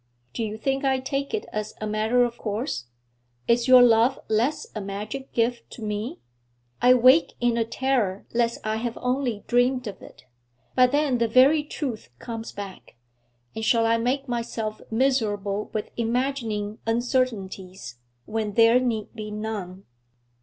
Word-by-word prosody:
'Do 230 - -2
you 215 0 -4
think 270 +4 -1
I 265 -1 +2
take 275 +1 -3
it 435 -1 -2
as 215 0 -4
a 215 - -3
matter 215 +3 +2
of 240 -1 -1
course? 210 - -3 0.6
Is 235 +1 +3
your 255 -1 +9
love 235 +2 +4
less 235 +8 +1
a 215 - -4
magic 205 +7 -6
gift 235 +1 -1
to 230 - -9
me? 210 +2 -3 0.6
I 250 +1 +7
wake 255 +6 +5
in 240 -1 +2
a 230 - +2
terror 230 -5 -1
lest 235 0 +1
I 215 0 0
have 235 0 -3
only 250 -4 -1
dreamed 250 +1 +2
of 200 -4 -7
it; - - -15 0.5
but 250 -1 +4
then 285 -4 +2
the 230 - +2
very 270 +6 +5
truth 265 - -5
comes 225 - -6
back, 200 - -9 0.6
and 220 - -4
shall 230 0 +3
I 230 0 +3
make 265 +4 -1
myself 230 -3 -3
miserable 215 -5 0
with 215 - -4
imagining 230 -3 -1
uncertainties, 200 - -2 0.3
when 215 -1 -3
there 230 +2 +6
need 230 -4 -2
be 215 -2 -6
none?' 210 -3 -5
230 Hz, 155 wpm, -25 LUFS, 215-255 Hz, 0.6 s, your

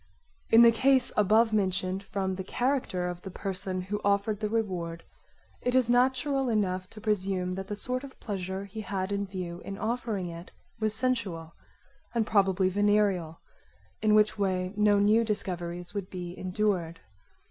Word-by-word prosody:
In 230 +1 +8
the 235 - +8
case 260 +3 +3
abovementioned, 200 -3 +2
from 195 -1 -2
the 190 0 -4
character 240 -5 -1
of 175 0 -5
the 190 - -7
person 190 0 -3
who 205 +3 -3
offered 200 +1 +1
the 210 -1 -1
reward 180 -7 -2 0.6
it 250 0 0
is 250 -2 +3
natural 260 +2 +2
enough 185 -4 0
to 220 - -12
presume 190 -4 0
that 190 +1 -5
the 205 - -3
sort 255 +5 -2
of 275 -1 -11
pleasure 190 -1 -4
he 215 +2 -7
had 195 -2 -3
in 200 0 -1
view 180 -2 -6
in 195 - -6
offering 220 -5 -2
it 170 +1 -9 0.3
was 215 -1 0
sensual 200 -10 -1 0.6
and 230 -2 +2
probably 195 -3 +3
venereal, 200 -4 +1 0.6
in 215 -1 +4
which 210 0 +3
way 185 -1 0
no 210 0 +4
new 210 +3 +4
discoveries 180 -5 -3
would 200 -2 -4
be 180 -1 -6
endured. 185 -4 -1
200 Hz, 160 wpm, -28 LUFS, 185-220 Hz, 0.6 s, In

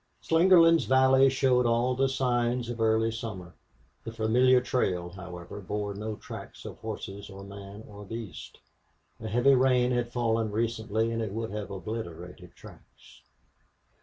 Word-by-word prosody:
Slingerland's 165 -2 +5
valley 130 +1 +5
showed 130 -2 +2
all 120 +2 +2
the 135 +1 +1
signs 120 -2 0
of 120 -1 -5
early 110 0 +2
summer. 110 -6 -7 0.5
The 115 - -6
familiar 125 +3 +3
trail, 95 -9 -1
however, 90 +1 -9
bore 105 +1 -4
no 105 +2 -5
tracks - - -10
of - - -8
horses 100 +1 -7
or 95 0 -10
man 100 +1 -10
or 105 -1 -11
beast. 110 -3 -8 0.6
A 110 - -6
heavy 120 +5 +4
rain 125 -1 +3
had 120 -1 -1
fallen 115 -2 0
recently 110 0 -1
and 115 0 -2
it 110 -3 -3
would 115 0 -4
have 105 -1 -5
obliterated 90 -4 -7
tracks. - - -17
115 Hz, 145 wpm, -28 LUFS, 100-125 Hz, 0.6 s, Slingerland's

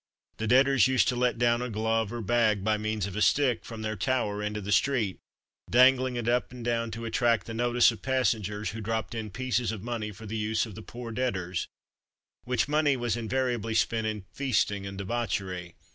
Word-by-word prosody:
The 110 - -2
debtors 135 +1 +5
used 130 -1 +3
to 125 - 0
let 125 -1 +1
down 120 0 +2
a 125 - -3
glove 110 0 0
or 120 -1 -4
bag 110 -2 +2
by 110 +1 +2
means 110 -1 -2
of 100 -1 -6
a 105 - -2
stick, 130 0 +3
from 110 -1 -7
their 110 0 -2
tower 105 -2 -1
into 105 0 -2
the 100 0 -5
street, 115 -6 +1 0.5
dangling 130 +1 +5
it 120 -1 -3
up 120 +1 +1
and 125 -2 -8
down 115 -1 0
to 115 +1 -6
attract 115 0 +1
the 115 - -6
notice 120 +1 +4
of 110 -3 -10
passengers, 110 -6 0
who 110 - -6
dropped 110 -1 -2
in 110 -2 -4
pieces 125 +2 -1
of 105 -3 -6
money 115 -3 -3
for 105 +3 -11
the 110 +1 -4
use 110 0 0
of 110 - -9
the 110 - -9
"poor 120 +1 -8
debtors," 95 -8 -2 0.8
which 125 -1 +1
money 150 -2 +2
was 120 -2 -1
invariably 120 -1 -1
spent 110 -1 +1
in 105 -3 -4
feasting 105 -7 0
and 95 0 -7
debauchery. 95 -4 -3
115 Hz, 205 wpm, -28 LUFS, 105-125 Hz, 0.8 s, debtors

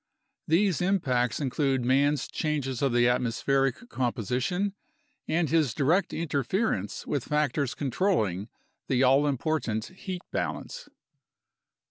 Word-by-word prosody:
These 180 +2 +2
impacts 130 - +1
include 135 -2 0
man's 140 +3 +2
changes 140 -5 -2
of 140 -2 +2
the 120 0 +4
atmospheric 135 - +1
com 125 - 0
position 130 - -1 0.5
and 165 +1 +1
his 150 -6 +2
direct 165 +8 +2
interference 170 - -1
with 140 -4 -2
factors 145 -3 0
controlling 120 - 0 0.4
the 130 0 +2
all 135 +3 +5
important 130 -6 -1
heat 185 -1 -7
balance. - - -4
140 Hz, 110 wpm, -28 LUFS, 125-165 Hz, 0.5 s, all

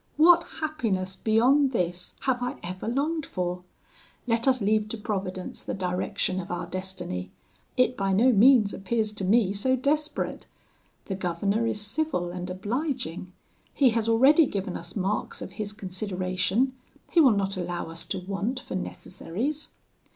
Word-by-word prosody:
What 340 +2 +7 0.2
happiness 210 -12 -1
beyond 260 +5 +3
this 180 -4 -2
have 255 -2 0
I 245 0 -2
ever 185 +3 -5
longed 295 +6 0
for? 180 -5 -3 0.6
Let 230 0 +1
us 260 -1 +4
leave 215 0 +1
to 230 - -4
Providence 190 -3 -4
the - - -4
direction 185 0 -1
of 185 - -6
our 175 - -3
destiny; 185 - -5 0.5
it 255 0 +3
by 195 -3 0
no 230 +7 +5
means 230 -1 +6
appears 215 +2 -1
to 210 -2 -5
me 200 0 +3
so 260 +6 +1
desperate. 295 +4 -1 0.6
The 195 - -3
governor 195 +5 0
is 210 - -1
civil 210 - -1
and 180 0 -5
obliging; 205 - -3 0.4
he 265 -4 +5
has 225 0 0
already 270 +7 +6
given 195 -4 -3
us 175 +2 -7
marks 200 +1 -1
of - - -7
his 205 +1 -4
consideration; 190 +4 -1 0.4
he 345 - +4
will 275 - +7
not 195 0 0
allow 175 -2 -4
us 165 - -5
to - - -2
want 200 +7 -2
for - - -8
necessaries. 210 - -3
205 Hz, 155 wpm, -27 LUFS, 185-255 Hz, 0.6 s, What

